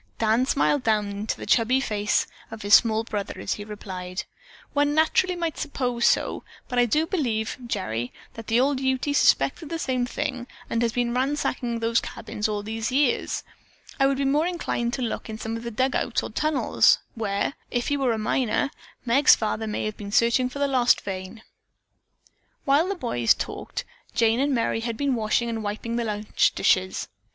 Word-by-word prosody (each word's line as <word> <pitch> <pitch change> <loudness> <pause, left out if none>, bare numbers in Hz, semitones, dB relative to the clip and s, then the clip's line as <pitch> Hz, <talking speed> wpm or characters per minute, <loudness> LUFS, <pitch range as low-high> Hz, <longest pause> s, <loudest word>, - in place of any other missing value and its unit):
Dan 225 +3 +2
smiled 285 0 +2
down 215 -3 +1
into 205 +2 -3
the - - -7
chubby 245 +2 +3
freckled 270 - -3
face 205 +1 +1 0.2
of 225 -2 -8
his 205 0 +1
small 220 0 +6
brother 205 -3 -4
as - - -2
he 205 - -6
replied: 190 -3 -6 0.5
"One 290 0 +2
naturally 340 +3 +3
might 335 -2 -3
suppose 250 -5 0
so, - - +1 0.2
but 250 -2 0
I 240 - +4
do 305 +8 +2
believe, 240 - -1
Gerry, 120 - -2 0.2
that 225 -1 -9
the 230 +2 +3
old 270 +1 +2
Ute 265 +2 0
suspected 290 +2 +3
the 330 - -2
same 255 -5 -1
thing 255 -3 -3 0.2
and 230 - +1
has 235 -1 +2
been 240 -1 0
ransacking 255 -2 -1
those 230 0 +2
cabins 215 -2 -4
all 205 -1 -2
these 225 +2 -3
years. 270 -1 +1 0.6
I 270 - +5
would 275 0 +1
be 275 - 0
more 295 +5 +2
inclined 290 -9 -2
to 255 - -2
look 230 - -4
in 220 - -5
some 225 +1 -4
of 230 - -5
the 235 - -5
dug 255 +4 0
outs - - 0
or - - -6
tunnels 305 -2 +3 0.2
where, 205 +2 -1 0.2
if 245 -1 -1
he 285 - +1
were 260 -4 +1
a - - -2
miner, 250 +5 0 0.3
Meg's 265 +5 +6
father 220 0 -2
may 210 - -2
have 215 0 -4
been 200 -1 -7
searching 235 +4 +3
for 255 - -8
the 285 0 +1
lost 255 -3 +3
vein." 190 +3 -6 1.2
While 290 +4 +4
the 395 - -1
boys 120 - +2
talked - - -5 0.3
Jane 230 +1 +3
and 285 +2 +2
Merry 230 -3 +1
had 230 -1 -3
been 280 -2 +1
washing 225 0 +1
and 225 -1 -3
wiping 220 +3 -3
the 235 - -1
lunch 210 -1 +1
dishes. 185 0 +1
235 Hz, 195 wpm, -25 LUFS, 215-275 Hz, 1.2 s, small